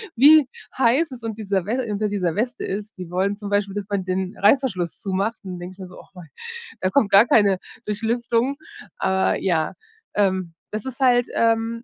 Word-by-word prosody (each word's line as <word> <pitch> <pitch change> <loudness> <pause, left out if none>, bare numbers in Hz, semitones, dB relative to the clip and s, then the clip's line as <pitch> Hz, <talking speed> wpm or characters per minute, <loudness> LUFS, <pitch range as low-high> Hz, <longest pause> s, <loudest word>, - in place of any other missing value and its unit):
wie 290 +3 +7 0.3
heiß 265 +5 +3
es 245 -3 -10
un 225 -2 -4
dieser 200 -4 -2
We 245 +4 -1
unter 210 +1 0
dieser 185 -5 -1
Weste 240 +5 -2
ist, 205 +3 -5
die 180 -2 -8
wollen 190 +3 0
zum 205 -1 -7
Beispiel, 205 -1 0
dass 205 -1 -4
man 200 -2 -1
den 185 0 -2
Reißverschluss 205 - +2
zumacht, 200 +3 -1
dann 185 -2 -6
denke 175 +1 -8
ich 185 - -23
mir 190 - -7
so: 180 - -13
„Och - - -17
Mann, 175 -4 -12 0.5
da 185 - 0
kommt 215 -2 +2
gar 205 +5 +7
keine 205 -4 +4 0.3
Durchlüftung.“ 235 +4 0 0.4
Ah 190 0 +1
ja, 165 -5 0 0.4
ähm, 190 -4 +1 0.2
das 215 0 -4
ist 265 0 -7
halt, 245 -2 +4
ähm 230 0 +1
205 Hz, 195 wpm, -22 LUFS, 190-230 Hz, 0.5 s, wie